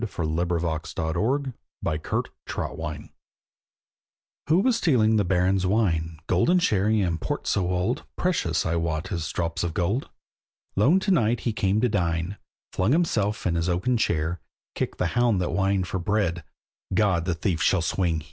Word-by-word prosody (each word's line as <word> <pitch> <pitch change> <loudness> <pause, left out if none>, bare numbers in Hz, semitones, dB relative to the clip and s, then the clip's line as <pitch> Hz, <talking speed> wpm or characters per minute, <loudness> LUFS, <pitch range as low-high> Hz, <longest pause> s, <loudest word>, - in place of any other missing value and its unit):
THE 115 - -1
RAPE 85 -1 -2
OF 85 -2 0 0.3
THE 115 - 0 0.3
BARON'S 75 0 -3
WINE 80 -2 -6 1.3
Who 160 +4 +4
was 250 0 +2
stealing 120 - +3
the 105 - +3
Baron's 95 +1 +2
wine, 85 -6 +1
Golden 130 - +3
sherry 110 - +2
and 85 -4 -1
port - - -3
so 90 -3 +1
old, 90 +7 0
Precious, 90 - 0
I 85 +1 0
wot, 80 -1 -2
as 85 -4 -2
drops 85 -1 -2
of 85 -2 -3
gold? 100 +9 0 0.7
Lone 140 - +4
to 195 - 0
night 120 - +2
he 115 - -1
came 100 0 +1
to 125 - +3
dine, 85 -2 -1 0.4
Flung 100 +8 +2
himself 110 - +1
in 90 - +1
his 85 +1 0
oaken 95 +9 +1
chair, 85 -5 0 0.3
Kicked - - -3
the - - 0
hound 120 -5 +3
that 90 - -1
whined 95 0 +1
for 95 - -2
bread; 90 -3 0 0.5
"God! 90 -3 +2
the 90 -2 0
thief 85 +1 -1
shall 95 -4 +3
swing!" 85 -1 0
95 Hz, 165 wpm, -25 LUFS, 85-110 Hz, 1.3 s, Who